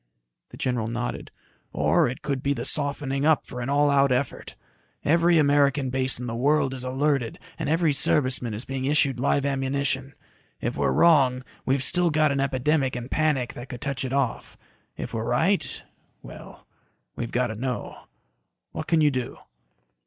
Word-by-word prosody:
The - - -12
general 125 -4 -1
nodded. 120 +1 -4 0.4
"Or - - +3
it 125 +1 -6
could 140 -2 -2
be 140 +1 +1
the 120 -3 -5
softening 140 -2 -1
up 155 0 +3
for 125 - -7
an 120 - -3
all 145 +1 +3
out 140 -1 +3
effort. 130 +1 -2 0.5
Every 170 +2 +4
American 140 -2 +3
base 130 -1 0
in 125 - -5
the 120 - -4
world 135 +2 +1
is 130 -1 -5
alerted 130 -2 0 0.2
and 155 -3 -2
every 165 -1 +2
serviceman 130 -5 +1
is 110 - -4
being 135 -1 -4
issued 140 -3 +2
live 140 +1 +1
ammunition. 135 0 -1 0.4
If - - -3
we're - - +1
wrong, 130 - +4 0.2
we've 135 0 +2
still 175 +5 +2
got 155 -1 +2
an 140 - -1
epidemic 135 0 +1
and 120 +1 -6
panic 150 -6 0
that 120 +2 -9
could 125 -3 -8
touch 140 -1 -3
it 130 - -4
off. 135 -4 -2 0.4
If - - -6
we're 110 - -2
right... 160 - 0 0.4
well, - - -12 0.5
we've 120 - -4
got 120 -2 0
to - - -9
know. 125 0 -5 0.7
What 155 - -6
can 165 -2 +3
you 150 -1 +4
do?" 125 -2 -4
135 Hz, 175 wpm, -25 LUFS, 125-145 Hz, 0.7 s, Every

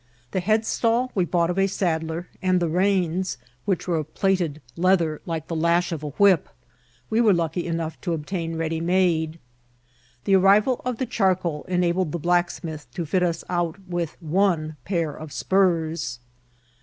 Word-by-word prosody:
The 190 - 0
headstall 225 +4 +1
we 185 -3 +1
bought 170 0 +1
of 185 - -2
a 195 - +4
saddler, 165 -3 -2
and 185 -1 +2
the 170 -2 0
reins, 185 0 +1 0.3
which 190 -3 -1
were 170 -2 +1
of 155 0 -4
platted 180 -6 +1 0.2
leather 170 -3 +2
like 160 -2 -3
the 165 - -3
lash 170 +2 +2
of 160 -3 -3
a 150 - -4
whip, 190 +2 +3 0.6
we 225 +2 +3
were 210 -5 +5
lucky 170 +1 -1
enough 165 -1 -3
to 175 - -1
obtain 165 +1 -3
ready 160 0 -2
made. 170 -2 +1 0.9
The 195 -1 +4
arrival 205 +6 +4
of 250 -2 -1
the 260 - -1
charcoal 185 -9 0
enabled 180 -2 +1
the - - 0
blacksmith 170 -2 -1
to 175 -3 -2
fit 180 +5 +1
us 170 -2 0
out 175 -1 -1
with 175 -3 -3
one 165 -2 +1
pair 170 -5 -1
of 155 -1 -9
spurs. 165 -8 +1
175 Hz, 165 wpm, -24 LUFS, 160-190 Hz, 0.9 s, were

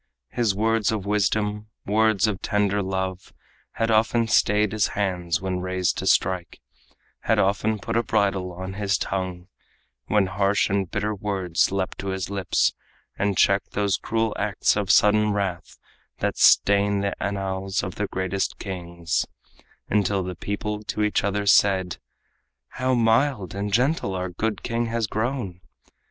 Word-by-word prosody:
His 115 -5 0
words 110 +1 +1
of 105 -3 -3
wisdom, 105 +1 0 0.2
words 110 0 +3
of 105 -4 -2
tender 105 -1 +1
love, 95 -1 -3 0.4
Had 115 0 0
often 115 +1 +2
stayed 105 -1 +3
his 110 -2 +1
hands 90 -4 -1
when 95 -1 -2
raised 95 -1 -1
to - - -3
strike, 90 -3 +1 0.6
Had - - +1
often 105 +3 +1
put 115 +3 -4
a 115 - +4
bridle 100 -5 0
on 95 +2 -6
his 100 -1 0
tongue 90 -2 -4 0.6
When 105 -2 +3
harsh 100 +1 +1
and 100 -2 0
bitter 105 +2 -1
words 95 -5 0
leaped 95 -1 -2
to 100 - -5
his 95 0 -3
lips, 100 -3 +1 0.5
And 100 -2 0
checked 100 0 +2
those 100 -2 +1
cruel 115 +1 -1
acts 100 -1 +1
of 100 -2 -2
sudden 105 0 +4
wrath 100 -3 -3 0.4
That - - -1
stain 100 0 +4
the 100 0 -1
annals 95 -1 -2
of 90 - -4
the 105 - -3
greatest 95 +1 -2
kings, 85 -3 -3 0.6
Until 100 -2 +1
the 90 0 -4
people 105 +3 -4
to 105 0 -2
each 105 - +1
other 100 0 -1
said: 95 -3 +3 0.7
"How 130 0 0
mild 115 - +2
and 100 +1 -3
gentle 125 -3 +1
our 90 0 -3
good 105 +3 -3
king 115 0 -1
has 115 0 -1
grown!" 110 -4 -3
100 Hz, 150 wpm, -24 LUFS, 95-105 Hz, 0.7 s, a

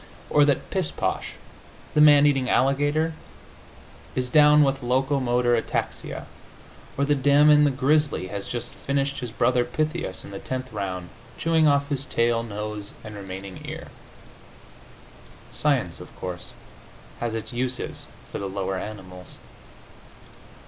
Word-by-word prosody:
Or 145 -1 +6
that 145 -2 0
Pishposh, - - -2 0.6
the 150 - +4
man 145 -1 +8
eating 135 -3 +2
alligator, 145 +4 +2 1.0
is 125 -1 -1
down 150 0 +7
with 135 -1 +1
locomotor 125 -1 +2
ataxia. 115 - -3 0.7
Or 140 - +2
that 145 -1 +1
Damon, 150 +2 +6
the - - +4
grizzly, 140 -3 +1
has 100 0 -5
just 120 0 -5
finished 140 0 -2
his 125 - -5
brother 120 +2 +2
Pythias 155 - -3
in - - -10
the 100 - -6
tenth 130 -1 -5
round, 95 -3 -4 0.3
chewing 160 -1 +3
off 140 -1 +2
his 140 -1 -2
tail, 115 0 +2
nose 105 -2 -6
and 110 -1 -8
remaining 95 -1 -8
ear. - - -7 1.6
Science, - - 0
of - - -12
course, 90 -2 -6 0.7
has 120 -1 -2
its 110 +1 -3
uses 125 +1 -3 0.2
for - - -4
the 100 - -4
lower 95 0 -2
animals. 95 -4 -9
130 Hz, 130 wpm, -25 LUFS, 105-145 Hz, 1.6 s, man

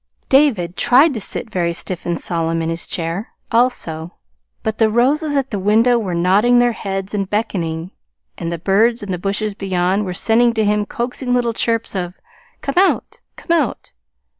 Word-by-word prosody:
David 225 - +3
tried 270 +5 +5
to 225 - -4
sit 220 - -5
very 170 -3 0
stiff 175 +1 -4
and 170 -1 -1
solemn 165 -1 -1
in 165 - -2
his 165 0 -4
chair, 170 +5 -4 0.2
also; 175 -9 0 0.5
but 220 0 -2
the 220 -1 +4
roses 285 +7 +1
at 270 -1 0
the 205 - -2
window 225 +5 +3
were 190 -6 -3
nodding 200 +8 +3
their 240 0 +4
heads 195 -2 -4
and 195 -2 -2
beckoning; 180 -5 -2 0.4
and 165 - -4
the 170 - -2
birds 210 +7 +2
in 200 - -5
the 180 - -2
bushes 200 +3 -2
beyond 190 0 0
were 180 -1 -4
sending 235 +3 +2
to 220 -1 +1
him 210 0 +1
coaxing 245 +1 -2
little 240 -2 +1
chirps 230 -1 -1
of 180 -1 -3 0.5
"Come 275 - -3
out, 385 - +1 0.2
come - - -7
out!" 330 - -2
210 Hz, 180 wpm, -18 LUFS, 180-240 Hz, 0.5 s, tried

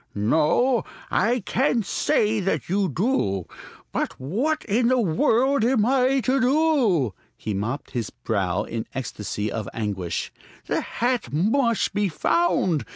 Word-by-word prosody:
"No, 160 - +2 0.3
I 235 +4 +2
can't 235 +1 0
say 215 +2 +1
that 195 -1 -1
you 190 +1 +1
do. 145 - 0 0.5
But - - -3
what 230 - -1
in 230 +3 +2
the 255 +1 +3
world 230 - +2
am 235 -3 +3
I 265 +1 +3
to 260 +3 +1
do?" 250 - +2 0.2
He 110 - -4
mopped 115 +9 -3
his 120 -5 -3
brow 100 -2 -1
in 115 0 -5
the - - -8
ecstasy 105 -4 -4
of 110 -3 -4
anguish. 95 -6 -3 0.3
"The - - -1
hat 240 - -2
must 225 - +1
be 205 -1 +1
found. 180 - +1
200 Hz, 140 wpm, -24 LUFS, -, 0.5 s, the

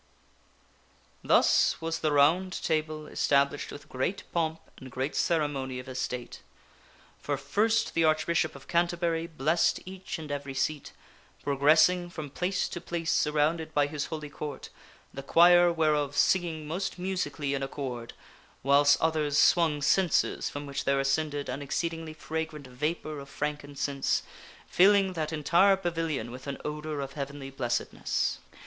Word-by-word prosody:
Thus - - +4
was 165 0 -3
the 155 - 0
Round 165 +6 +3
Table 155 -1 -1
established 140 -1 +1
with 145 - -10
great 130 +10 -2
pomp 160 -1 -1 0.2
and 130 - -10
great 130 +4 -3
cere 160 -3 +2
mony 130 -3 -4
of 125 +1 -8
estate. 125 -1 -5 0.8
For 145 -1 -2
first 215 +12 +1
the 165 - +2
Archbishop 155 0 +1
of 135 - -13
Canterbury 170 -1 0
blessed 155 +2 +1
each 185 0 -6
and 155 -2 -7
every 140 -1 -4
seat, 145 +2 -2 0.5
progressing 155 +5 +4
from 155 -5 -7
place 185 +4 -1
to 175 - -6
place 170 -1 -2
surrounded 155 +1 +1
by 145 -1 +4
his 145 -1 -3
Holy 155 -3 -6
Court, 150 -1 -7 0.4
the 135 - -6
choir 175 +4 +6
whereof 150 -3 +1
singing 165 -4 +2
most 185 +6 -3
musically 180 -6 -2
in 140 - -2
accord, 130 -4 -5 0.5
whiles 140 +1 +5
others 155 -3 +1
swung 160 -4 +4
censers 180 +2 +2
from 145 0 -6
which 140 -1 -4
there 140 0 +2
ascended 145 +1 0
an 140 - -4
exceedingly 165 +2 -3
fragrant 160 -2 -5
vapor 150 +4 -3
of 140 0 -10
frank 150 +1 -3
incense, 140 -1 -1 0.4
filling 195 0 +4
that 155 -2 -3
entire 175 +6 +4
pavilion 165 -9 -2
with 130 +3 -10
an 140 - -4
odor 150 -1 -4
of 135 0 -6
Heavenly 140 -1 -6
blessedness. 120 -3 -1
150 Hz, 145 wpm, -28 LUFS, 140-165 Hz, 0.8 s, choir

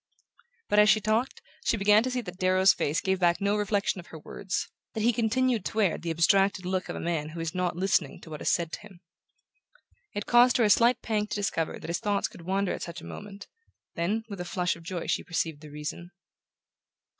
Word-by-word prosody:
But 205 - +3
as 210 0 +6
she 215 - +5
talked 220 +5 -1 0.2
she - - +1
began 210 +2 +5
to 255 - -2
see 250 0 -1
that 180 -4 -9
Darrow's 185 +1 +5
face 150 +3 -1
gave 190 -1 0
back 175 -1 +3
no 200 +1 +1
reflection 205 -2 0
of 175 - -11
her 160 - -10
words, 185 +5 -4 0.3
that 220 - -1
he 240 +1 +4
continued 235 0 +1
to - - -4
wear 200 -6 +2
the 170 - -5
abstracted 190 +3 +3
look 185 0 -2
of - - -4
a - - -5
man 165 -3 -2
who 165 +2 -8
is 165 0 -3
not 180 -2 -1
listening 180 -6 0
to 160 - -12
what 150 - -7
is - - +1
said 170 -2 0
to - - -5
him. 195 -4 -15 1.1
It 205 - -3
caused 245 +1 +5
her 240 - +3
a 210 - +4
slight 240 +3 +4
pang 210 -2 0
to - - -4
discover 200 -6 -1
that - - -9
his 170 +1 -1
thoughts 205 -1 0
could - - -14
wander 190 +2 -1
at - - -6
such 170 0 -6
a - - -11
moment; 205 -1 -9 0.5
then, 200 +7 -1
with 200 -4 -6
a - - -2
flush 180 0 -1
of 170 - -13
joy 170 +1 -5
she - - -1
perceived 160 -3 -2
the 155 - -11
reason. 150 +4 -6
190 Hz, 230 wpm, -28 LUFS, 170-210 Hz, 1.1 s, as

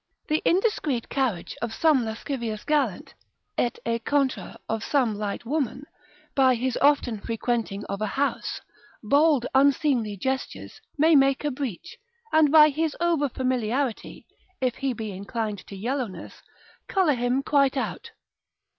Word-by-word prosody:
The 305 +1 +1
indiscreet 335 - +1
carriage 250 -11 -1
of 225 -1 -3
some 305 -6 +3
lascivious 225 -1 -4
gallant 280 -11 0 0.4
(et 240 - 0
e 230 0 0
contra 275 +2 -1
of 225 0 -2
some 255 -7 +1
light 205 +2 -4
woman) 275 0 -2 0.5
by 260 -2 +4
his 250 +1 -1
often 280 -6 +3
frequenting 225 -2 -2
of 200 - -5
a 215 - 0
house, 275 +7 -2 0.4
bold 285 +2 +3
unseemly 265 -6 +2
gestures, 265 +6 -4 0.2
may 315 +2 +5
make 275 0 +4
a 295 - +1
breach, 270 - -6 0.3
and 310 -2 +5
by 305 -1 +8
his 310 +1 -2
over 335 -5 +1
familiarity, 255 -1 -2 0.3
if 255 -2 -1
he 270 -1 -1
be 220 -3 -5
inclined 205 +2 -4
to 200 - -9
yellowness, 235 0 -4 0.5
colour 370 -6 +2
him 245 +2 0
quite 275 -2 +2
out. - - -3
260 Hz, 135 wpm, -25 LUFS, 225-285 Hz, 0.5 s, by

